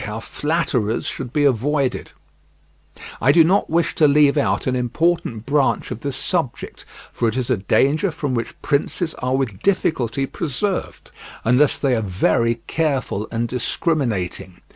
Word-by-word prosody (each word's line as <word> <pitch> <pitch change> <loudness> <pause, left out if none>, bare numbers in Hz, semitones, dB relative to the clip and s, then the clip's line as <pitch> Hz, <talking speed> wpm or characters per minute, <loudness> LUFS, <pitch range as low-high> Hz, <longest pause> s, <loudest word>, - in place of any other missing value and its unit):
HOW 105 0 -5
FLATTERERS 130 -5 -1
SHOULD 125 -3 -5
BE 150 +1 +1
AVOIDED 140 +1 0 1.1
I 130 - +5
do 165 +2 +6
not 185 +5 +2
wish 170 +1 +1
to 155 - +4
leave 145 0 +4
out 145 - 0
an 130 - 0
important 125 -1 -1
branch 140 +1 +1
of - - -4
this 140 -1 -4
subject, 160 -4 -3 0.3
for 120 - 0
it 110 - -4
is 130 0 -1
a 125 - +2
danger 140 - +2
from 150 -5 -3
which 115 -1 -4
princes 155 +3 0
are 130 +1 0
with 115 -8 -3
difficulty 135 - 0
preserved, 170 +8 -3 0.3
unless 125 +5 +3
they 135 -3 +1
are 115 - 0
very 110 +4 +1
careful 135 -9 -1
and 115 +1 -1
discriminating. 115 - -2
135 Hz, 150 wpm, -21 LUFS, 115-150 Hz, 1.1 s, do